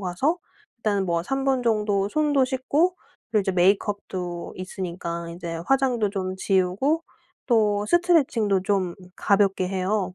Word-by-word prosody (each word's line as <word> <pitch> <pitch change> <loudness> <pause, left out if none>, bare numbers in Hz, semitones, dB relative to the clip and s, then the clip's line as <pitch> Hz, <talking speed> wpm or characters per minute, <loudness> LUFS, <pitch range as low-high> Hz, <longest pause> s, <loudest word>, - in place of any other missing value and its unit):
가서 200 - 0 0.4
일단은 205 -4 0
뭐 170 -1 0
3 270 +9 -2
분 265 -2 +1
정도 210 -4 +1
손도 290 +1 +2
씻고 285 +8 +1 0.3
그리고 215 - +3
이제 190 0 -1
메이크업도 185 -1 0
있으니까 170 -2 -5
인제 170 -1 -6
화장도 255 -6 +2
좀 185 -2 -3
지우고 195 - +1 0.4
또 210 -4 +2
스트레칭도 265 - +2
좀 190 -3 0 0.2
가볍게 195 -2 +2
해요. 190 0 -1
200 Hz, 285 characters per minute, -24 LUFS, 185-255 Hz, 0.4 s, 그리고